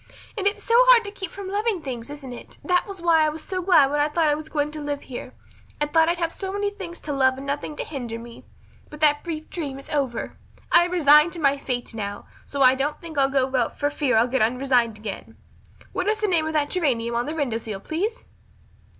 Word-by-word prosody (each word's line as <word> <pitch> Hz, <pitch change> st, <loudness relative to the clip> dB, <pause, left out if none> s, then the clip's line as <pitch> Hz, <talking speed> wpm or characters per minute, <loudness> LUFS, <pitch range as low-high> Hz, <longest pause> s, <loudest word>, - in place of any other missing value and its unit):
And 400 Hz, -2 st, 0 dB
it's 405 Hz, -, -1 dB
so 460 Hz, -, -1 dB
hard -, -, +7 dB
to 405 Hz, -, -5 dB
keep 385 Hz, -3 st, -6 dB
from 395 Hz, +1 st, -8 dB
loving 410 Hz, 0 st, 0 dB
things, 245 Hz, -2 st, -6 dB
isn't 285 Hz, -3 st, -8 dB
it? 240 Hz, -, -11 dB
That 360 Hz, -1 st, +1 dB
was 390 Hz, -4 st, -8 dB
why 330 Hz, -2 st, +5 dB
I 310 Hz, -, +3 dB
was 310 Hz, +1 st, -6 dB
so 370 Hz, -1 st, -3 dB
glad 315 Hz, -7 st, +5 dB
when 295 Hz, -, 0 dB
I 295 Hz, -, +3 dB
thought 310 Hz, +1 st, +1 dB
I -, -, +3 dB
was 310 Hz, +1 st, -5 dB
going 295 Hz, -1 st, -1 dB
to 305 Hz, 0 st, -7 dB
live 290 Hz, -1 st, -4 dB
here. 250 Hz, -, -8 dB, 0.4 s
I 295 Hz, -, +2 dB
thought 320 Hz, +2 st, +3 dB
I'd 345 Hz, -, 0 dB
have 335 Hz, -1 st, -2 dB
so 385 Hz, -1 st, -5 dB
many 405 Hz, +1 st, -1 dB
things 370 Hz, -4 st, -8 dB
to 295 Hz, -, -4 dB
love 260 Hz, -1 st, +3 dB
and 270 Hz, -, -7 dB
nothing 285 Hz, +2 st, -3 dB
to -, -, -3 dB
hinder 245 Hz, -6 st, -5 dB
me. 235 Hz, 0 st, -11 dB, 0.5 s
But 300 Hz, -, -11 dB
that 295 Hz, -1 st, +4 dB
brief 315 Hz, -3 st, -5 dB
dream 285 Hz, -6 st, -4 dB
is 275 Hz, -, -12 dB
over. 270 Hz, -5 st, -2 dB, 0.3 s
I 345 Hz, -, +6 dB
am 355 Hz, -, -5 dB
resigned 300 Hz, -1 st, +6 dB
to 345 Hz, -, -6 dB
my 280 Hz, -2 st, +3 dB
fate 250 Hz, -4 st, -4 dB
now, 205 Hz, -2 st, -5 dB, 0.2 s
so 280 Hz, -1 st, 0 dB
I 255 Hz, 0 st, +7 dB
don't 275 Hz, +3 st, -2 dB
think 330 Hz, -2 st, -9 dB
I'll 270 Hz, 0 st, +4 dB
go 265 Hz, -1 st, 0 dB
out 245 Hz, -3 st, 0 dB
for 290 Hz, 0 st, 0 dB
fear 280 Hz, -5 st, +1 dB
I'll 225 Hz, -, +5 dB
get 260 Hz, +1 st, 0 dB
unresigned 245 Hz, -1 st, +2 dB
again. 210 Hz, -2 st, -8 dB, 0.6 s
What 370 Hz, -1 st, -2 dB
is 430 Hz, +1 st, +2 dB
the 425 Hz, -, 0 dB
name 330 Hz, -5 st, +1 dB
of 315 Hz, -, -3 dB
that 295 Hz, -2 st, 0 dB
geranium 245 Hz, -10 st, 0 dB
on 235 Hz, +2 st, -1 dB
the 310 Hz, -, -3 dB
window 255 Hz, -8 st, -1 dB
sill, 215 Hz, -3 st, -6 dB
please?" 390 Hz, -, -3 dB
295 Hz, 250 wpm, -24 LUFS, 260-345 Hz, 0.6 s, hard